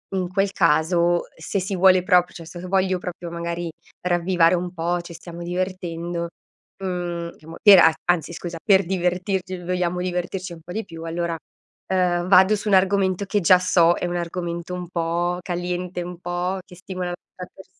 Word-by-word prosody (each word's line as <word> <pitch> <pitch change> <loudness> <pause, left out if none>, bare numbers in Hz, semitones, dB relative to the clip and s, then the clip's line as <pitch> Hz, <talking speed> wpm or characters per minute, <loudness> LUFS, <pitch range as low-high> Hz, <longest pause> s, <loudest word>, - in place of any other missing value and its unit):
in 185 -1 0
quel 195 +2 +1
caso 170 0 +2
se 190 +4 -2
si 190 +1 -3
vuole 185 0 +6
propr 180 -1 +3
cioè 165 - -9
se 175 +1 -9
voglio 185 0 +1
proprio 175 -1 -6
magari 170 0 -4 0.3
ravvivare 175 -1 +3
un 180 0 -3
po', 175 +1 -1
ci 170 0 -10
stiamo 170 +1 -9
divertendo, 175 -1 -3 0.5
mhmm, 175 -2 -3
chiamo 160 +1 -12
per 205 -3 +9
a 160 - +6
anzi 170 -1 +1
scusa 170 0 -6
per 195 -1 +5
divertirci, 185 +1 -1
vogliamo 180 0 -1
divertirci 180 0 -3
un 165 - -12
po' 175 - -10
di 220 +3 -3
più 165 -3 -9
allora, 165 0 -2 0.6
uhm, 180 -1 +1
vado 190 +2 +6
su 210 - -6
un - - +2
argomento 190 0 +2
che 205 +1 0
già 180 +1 +6
so 175 -2 +4
è 180 - -3
un 175 - -3
argomento 170 0 -4
un 180 -1 -5
po' 175 +1 -1
caliente 180 0 -3
un 175 0 -7
po' 175 +2 -2
che - - -16
stimola 185 0 -5
l'a 175 - -3 0.2
ta 180 - -7
pers 190 - -13
180 Hz, 180 wpm, -23 LUFS, 170-185 Hz, 0.6 s, per